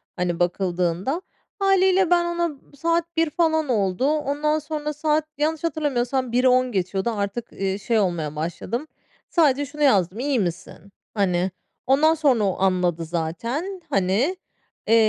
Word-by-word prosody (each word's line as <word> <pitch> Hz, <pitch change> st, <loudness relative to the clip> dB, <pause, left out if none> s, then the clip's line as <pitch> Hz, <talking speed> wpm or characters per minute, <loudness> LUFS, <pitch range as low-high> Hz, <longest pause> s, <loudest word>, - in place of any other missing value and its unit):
hani, 180 Hz, -2 st, -1 dB
bakıldığında. 180 Hz, -, 0 dB, 0.4 s
Hâliyle 380 Hz, -2 st, +3 dB
ben 345 Hz, -1 st, +4 dB
ona 345 Hz, 0 st, 0 dB
m 305 Hz, -, -7 dB, 0.2 s
saat 335 Hz, +2 st, -1 dB
01.00 325 Hz, -1 st, +3 dB
falan 315 Hz, -1 st, +1 dB
oldu. 200 Hz, -1 st, +1 dB
Ondan 300 Hz, +1 st, 0 dB
sonra 300 Hz, 0 st, -4 dB
saat 305 Hz, 0 st, +1 dB
yanlış 310 Hz, +1 st, -1 dB
hatırlamıyorsam 265 Hz, -6 st, -1 dB
01.15 245 Hz, -6 st, +2 dB
Artık, 205 Hz, +2 st, -3 dB
eee, 195 Hz, 0 st, -2 dB
şey 220 Hz, +2 st, 0 dB
olmaya 170 Hz, -6 st, -1 dB
başladım. 175 Hz, -, -4 dB, 0.4 s
Sadece 290 Hz, -4 st, +3 dB
şunu 295 Hz, +2 st, -4 dB
yazdım. 200 Hz, -, +3 dB
"İyi 270 Hz, -1 st, +1 dB
misin?" 180 Hz, +1 st, -5 dB, 0.2 s
Hani, 185 Hz, -3 st, +1 dB, 0.4 s
ondan 295 Hz, +5 st, +5 dB
sonra 275 Hz, -8 st, +2 dB
o 195 Hz, -2 st, 0 dB
anladı 180 Hz, -3 st, +1 dB
zaten, 230 Hz, -, -3 dB
hani. 200 Hz, -, +1 dB, 0.5 s
Eee, 225 Hz, -, +5 dB
255 Hz, 135 wpm, -23 LUFS, 190-310 Hz, 0.5 s, ondan